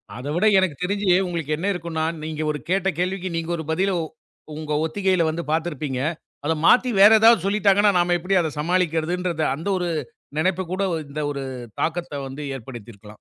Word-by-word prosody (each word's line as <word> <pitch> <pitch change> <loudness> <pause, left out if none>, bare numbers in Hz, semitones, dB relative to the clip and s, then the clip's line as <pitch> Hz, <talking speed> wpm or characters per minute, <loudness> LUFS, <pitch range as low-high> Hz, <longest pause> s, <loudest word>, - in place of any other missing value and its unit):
அத 125 +4 -7
விட 185 - +2
எனக்குத் 180 -5 0
தெரிஞ்சி, 200 +1 -1 0.2
உங்களுக்கு 160 -3 -2
என்ன 190 +5 -2
இருக்கும்ன்னா 165 -2 -3 0.2
நீங்க 155 0 -4
ஒரு 150 - -4
கேட்ட 195 0 +2
கேள்விக்கு, 185 0 -1
நீங்க 165 0 -3
ஒரு 160 - -5
பதிலை 190 +4 +1 0.6
உங்க 155 -1 -4
ஒத்திகையில 185 0 +1
வந்து 165 +2 -3
பாத்திருப்பீங்க. 150 -5 -2 0.5
அத 160 - +2
மாத்தி 250 0 +5
வேற 210 +2 +9
ஏதாவது 225 -5 +6
சொல்லிட்டாங்கன்னா, 205 0 +4
நாம 175 0 +2
எப்படி 185 +3 0
அதை 160 -2 -2
சமாளிக்கிறதுன்றது 170 0 0
அந்த 165 +7 -7
ஒரு 175 -1 -2 0.5
நெனைப்பு 185 +2 +1
கூட 195 +1 -1 0.2
இந்த 150 +2 -5
ஒரு 140 -1 -4 0.4
தாக்கத்த 160 -4 -2
வந்து 135 +3 -8 0.2
ஏற்படுத்தி 120 -2 -10
இருக்கலாம்! 105 +1 -14
170 Hz, 170 wpm, -23 LUFS, 155-185 Hz, 0.6 s, வேற